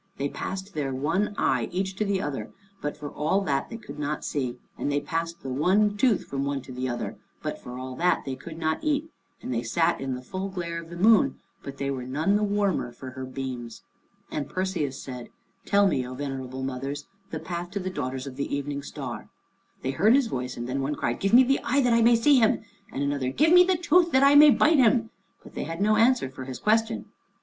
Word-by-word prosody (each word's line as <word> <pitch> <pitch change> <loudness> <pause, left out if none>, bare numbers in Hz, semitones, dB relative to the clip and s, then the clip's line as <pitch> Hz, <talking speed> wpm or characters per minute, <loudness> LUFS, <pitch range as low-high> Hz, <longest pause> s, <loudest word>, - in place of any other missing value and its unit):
They 140 +1 -1
passed 190 +5 -5
their 145 -3 -2
one 165 +10 0
eye 125 -3 +1
each 190 +1 -2
to 215 - 0
the 195 -1 0
other, 145 -2 -4 0.3
but 145 - -3
for 145 -1 -7
all 160 +7 +1
that 140 -7 -1
they 230 - -6
could 225 - -10
not 150 +1 -2
see, 130 -4 -2 0.2
and 145 - -2
they 145 - +2
passed 165 +2 -3
the 130 -1 -4
one 200 +9 +3
tooth 225 -1 +2
from 135 0 -3
one 140 0 -1
to 130 - -11
the 130 0 -3
other, 120 - -4 0.3
but - - -4
for 125 0 -8
all 130 0 -6
that 180 +1 +2
they 135 -1 -3
could 160 +3 -10
not 160 -1 -1
eat, 305 +1 0 0.3
and 125 - -3
they 115 - 0
sat 150 +8 +1
in 135 -1 -2
the 125 - -8
full 190 +8 -4
glare 170 -3 -4
of 165 - -13
the 170 - -8
moon, 205 -7 +5 0.2
but 140 0 -8
they 140 0 -2
were 130 -2 -3
none 155 +10 +1
the 210 - +2
warmer 200 -10 0
for 130 +2 -9
her 130 0 -6
beams. 130 -3 -6 0.5
And 145 -2 -3
Perseus 180 -8 -2
said, 125 -2 -8 0.4
"Tell 200 0 +4
me, 145 -8 +1
O 130 - -7
Venerable 130 -1 -5
Mothers, 135 +2 -4 0.2
the 160 - -4
path 175 +2 -5
to 200 +2 -4
the 185 0 -3
daughters 130 -4 -4
of 135 -2 -8
the 140 0 -2
Evening 140 0 -3
Star." 130 -5 -7 0.5
They 130 - 0
heard 210 - +4
his 275 -2 +4
voice, 125 - -4
and 120 0 -4
then 135 +2 -2
one 145 +2 -1
cried, 120 - -2
"Give 195 - 0
me 250 +2 +8
the 270 +2 +2
eye 275 +4 +2
that 245 -2 +3
I 230 - +4
may 235 +1 +6
see 265 +4 +5
him," 220 -2 +3 0.3
and 140 - -2
another, 140 -2 0
"Give 310 - +3
me 360 0 +9
the 365 0 +2
tooth 345 0 +3
that 265 +1 +5
I 280 +1 +7
may 295 +1 +9
bite 300 +2 +5
him," 230 -2 +3 0.3
but - - -14
they - - -4
had 165 +1 -5
no 215 +2 +3
answer 235 - +4
for 130 0 -8
his 130 -1 -6
question. 225 +1 +1
160 Hz, 235 wpm, -26 LUFS, 135-210 Hz, 0.5 s, me